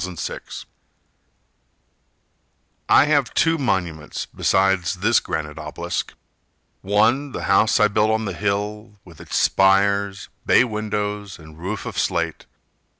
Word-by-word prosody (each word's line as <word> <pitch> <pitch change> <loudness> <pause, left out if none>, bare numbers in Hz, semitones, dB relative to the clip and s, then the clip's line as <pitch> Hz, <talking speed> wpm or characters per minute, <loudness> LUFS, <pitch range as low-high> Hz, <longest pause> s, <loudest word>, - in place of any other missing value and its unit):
Lambert 90 -2 -6
Hutchins - - -6 2.2
I - - +6
have 145 -3 +1
two 165 -1 +2
monuments 90 - -2
besides 95 -3 +1
this 105 +5 +3
granite 75 0 -5
obelisk: 75 -1 -5 0.7
One, 115 +8 +1
the - - -5
house 100 +5 +3
I 105 - +5
built 105 +1 +1
on 110 0 0
the 95 - -3
hill, 105 +3 -3
With 85 -4 -14
its - - -4
spires, 100 +1 +2 0.2
bay - - +5
windows, 105 -3 -4
and 80 -1 -15
roof 95 +5 -5
of - - -4
slate. 85 -2 -2
100 Hz, 125 wpm, -21 LUFS, 90-110 Hz, 2.2 s, I